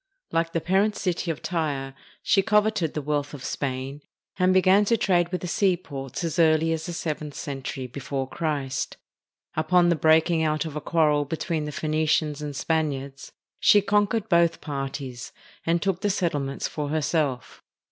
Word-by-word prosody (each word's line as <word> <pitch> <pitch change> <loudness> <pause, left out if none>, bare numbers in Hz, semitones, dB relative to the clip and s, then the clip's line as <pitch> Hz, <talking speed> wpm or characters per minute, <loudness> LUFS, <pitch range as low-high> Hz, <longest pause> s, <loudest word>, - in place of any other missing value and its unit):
Like 165 0 0
the 165 - 0
parent 200 +5 +2
city 180 -2 -2
of 160 - -3
Tyre, 145 -6 -2 0.3
she 195 - +4
coveted 210 -5 +1
the 150 - -2
wealth 145 0 -2
of 135 - -10
Spain, 135 +1 -3 0.4
and 185 0 +4
began 190 +2 +5
to 230 +3 +2
trade 175 -4 +2
with 180 - -2
the 180 - -4
seaports 170 - -1
as 165 +1 -2
early 160 0 +4
as 160 +1 -4
the 175 - -4
seventh 155 -3 -4
century 135 -2 -5
before 135 +1 -4
Christ. 145 -4 -3 0.6
Upon 175 +3 +3
the 170 - +3
breaking 160 +2 +3
out 155 0 0
of 155 -2 -6
a 150 - -3
quarrel 150 -3 +2
be 160 +3 -4
tween 160 -3 -2
the 150 - -4
Phoenicians 155 -1 0
and 145 -1 -5
Spaniards, 140 -4 -2 0.3
she 205 - +6
conquered 205 +2 +1
both 170 -3 +3
parties, 135 -3 -5 0.3
and 170 +1 +3
took 195 -2 0
the 205 - +1
settlements 150 -8 -1
for 150 -2 -4
herself. 150 -4 -1
160 Hz, 165 wpm, -25 LUFS, 145-175 Hz, 0.6 s, she